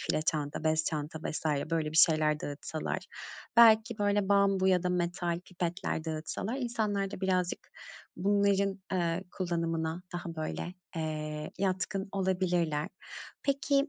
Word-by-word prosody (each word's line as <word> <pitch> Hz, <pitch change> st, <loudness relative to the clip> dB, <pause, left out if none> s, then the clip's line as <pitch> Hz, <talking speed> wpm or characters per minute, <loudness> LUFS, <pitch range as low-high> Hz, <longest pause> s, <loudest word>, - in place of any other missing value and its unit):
file 155 Hz, -, 0 dB
çanta, 150 Hz, -1 st, -1 dB
bez 155 Hz, 0 st, +2 dB
çanta 155 Hz, 0 st, -3 dB
vs. 155 Hz, -, -3 dB, 0.3 s
böyle 160 Hz, -2 st, 0 dB
bir 160 Hz, -, -3 dB
şeyler 155 Hz, -2 st, +5 dB
dağıtsalar, 145 Hz, +2 st, -3 dB, 0.6 s
belki, 225 Hz, -1 st, +7 dB
böyle, 205 Hz, -1 st, +2 dB
bambu 200 Hz, -1 st, +4 dB
ya 180 Hz, -2 st, +4 dB
da 180 Hz, -, 0 dB
metal 175 Hz, -1 st, -1 dB
pipetler 175 Hz, -2 st, -3 dB
dağıtsalar 160 Hz, +8 st, -3 dB
insanlar 215 Hz, -6 st, -1 dB
da -, -, -6 dB
birazcık 185 Hz, -2 st, 0 dB, 0.5 s
bunların, 200 Hz, +1 st, +2 dB
eee, 175 Hz, 0 st, 0 dB
kullanımına 165 Hz, -2 st, -1 dB
daha, 175 Hz, -1 st, -5 dB
böyle, 160 Hz, +3 st, -4 dB, 0.2 s
eee, 155 Hz, -1 st, -3 dB
yatkın 195 Hz, +1 st, -1 dB
olabilirler. 180 Hz, -5 st, +1 dB, 0.5 s
Peki 280 Hz, +1 st, +2 dB
180 Hz, 125 wpm, -31 LUFS, 160-195 Hz, 0.6 s, belki